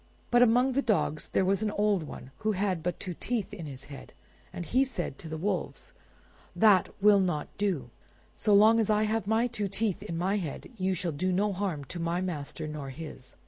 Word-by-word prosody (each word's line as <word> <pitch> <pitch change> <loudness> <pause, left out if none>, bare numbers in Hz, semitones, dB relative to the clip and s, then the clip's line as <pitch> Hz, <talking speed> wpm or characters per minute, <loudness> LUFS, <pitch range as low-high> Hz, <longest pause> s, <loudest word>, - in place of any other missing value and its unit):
But 240 0 +5
among 245 +2 +5
the 270 +2 +1
dogs 195 - 0
there 190 - +2
was 195 +1 +1
an 215 - +1
old 205 -2 +1
one, 140 -3 -9
who 215 0 0
had 190 -3 0
but 175 +1 -2
two 185 -2 -4
teeth 225 +3 -3
in 170 -6 -6
his 135 -2 -8
head, 140 -1 -11 0.4
and 175 - -6
he 255 +8 +3
said 180 - -4
to 160 - -8
the 160 - -4
wolves— 190 +3 -3 0.6
"That 210 -4 +5
will 205 -1 +7
not 175 -6 -1
do. 170 -13 -1 0.4
So 215 - 0
long 220 +3 +6
as 220 - +1
I 215 0 +3
have 215 -1 -1
my 220 +2 +3
two 225 -4 -2
teeth 195 0 -1
in 165 - -5
my 190 +4 +1
head 170 - -5
you 190 -2 0
shall 175 -1 -1
do 180 +6 -1
no 200 +3 +1
harm 180 -7 -3
to 175 - -7
my 170 +1 0
master 155 -3 -4
nor 150 -3 -5
his." 135 -2 -9
190 Hz, 215 wpm, -29 LUFS, 165-210 Hz, 0.6 s, will